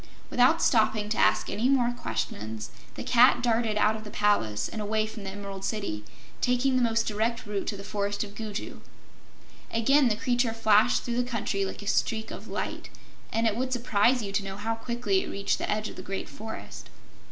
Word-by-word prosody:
Without 255 +7 +4
stopping 215 -2 +3
to 215 - -1
ask - - +3
any 220 +6 0
more 250 -3 +3
questions 110 - -4 0.2
the - - -5
Cat 245 0 +5
darted 225 -2 +1
out 210 +1 +3
of 215 - -7
the 210 - -8
palace 110 - +1
and 220 - -5
away 215 +1 0
from 215 -1 -8
the - - -3
Emerald 195 -1 -7
City, 195 - -3 0.4
taking 250 +1 +2
the 255 - +3
most 230 -1 +2
direct 225 +2 -1
route 205 -2 -3
to 205 - -2
the 200 - -8
Forest 205 0 -2
of 200 -1 -9
Gugu. 215 -1 -6 0.9
Again 270 +5 +4
the 220 - +2
creature 245 0 +1
flashed 220 +1 +4
through 240 -1 -2
the 245 - +2
country 205 -4 -1
like 190 - -6
a - - -9
streak 220 +1 0
of - - -8
light, - - -4 0.4
and 225 +1 +1
it 220 -2 +2
would 255 +2 -2
surprise 240 0 +2
you 200 - -4
to 200 0 0
know 195 0 -6
how 225 +2 -1
quickly 225 -4 0
it - - -6
reached 200 0 -1
the - - -3
edge 215 +1 0
of - - -9
the - - -5
Great 195 +1 -4
Forest. 220 +1 -8
215 Hz, 205 wpm, -28 LUFS, 200-235 Hz, 0.9 s, Cat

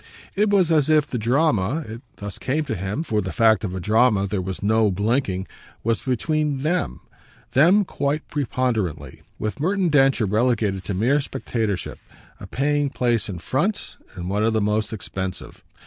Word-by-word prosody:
It 210 +2 +2
was 190 -5 +3
as 155 -2 +3
if 155 -2 +4
the 125 -5 -4
drama 125 - +1
it 115 +2 -8
thus 100 -2 -7
came 150 +4 -1
to 140 - -3
him, 100 - -3
for 110 -9 0
the 95 -2 -4
fact 110 0 +3
of 95 -3 -3
a - - -3
drama 105 +1 +3
there 100 -1 -2
was 95 +1 -5
no 110 +1 +3
blinking 100 -1 0 0.4
was 115 0 0
between 145 +2 -1
THEM, 175 +4 -1 0.5
them 180 +9 +5
quite 145 -1 -2
preponderantly; 125 - -2 0.2
with 110 +5 -4
Merton 185 +3 +1
Densher 135 -5 +4
relegated 105 -2 +1
to 100 - -2
mere 130 +9 +2
spectatorship, 115 -8 -3 0.4
a - - -9
paying 145 +1 0
place 120 -5 0
in 95 - -4
front, 150 - -2 0.2
and 90 -1 -6
one 100 +3 0
of 115 0 +2
the 110 - +2
most 105 +1 0
expensive. 95 -3 -6
115 Hz, 170 wpm, -23 LUFS, 100-145 Hz, 0.5 s, them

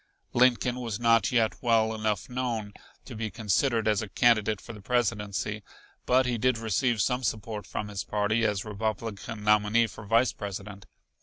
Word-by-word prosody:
Lincoln 125 0 +3
was 115 -4 -4
not 115 -4 +3
yet 115 -3 +1
well 110 -2 +2
enough 110 -4 -2
known, 120 -5 -3 0.3
to 130 - -9
be 110 0 -3
considered 110 +2 0
as 105 -2 +2
a 110 - -6
candidate 110 -4 +3
for - - -10
the 105 - -11
Presidency, 105 -2 -1 0.5
but 130 +1 +4
he 120 -2 -1
did 130 +1 +2
receive 115 +1 0
some 125 +3 +1
support 110 -2 -3
from 105 - -4
his 100 -1 -4
party 105 +2 0
as 105 -2 0
Republican 110 0 -4
nominee 105 +2 +4
for 115 - -9
Vice 115 +4 +2
President. 100 -1 -7
110 Hz, 165 wpm, -28 LUFS, 105-120 Hz, 0.5 s, but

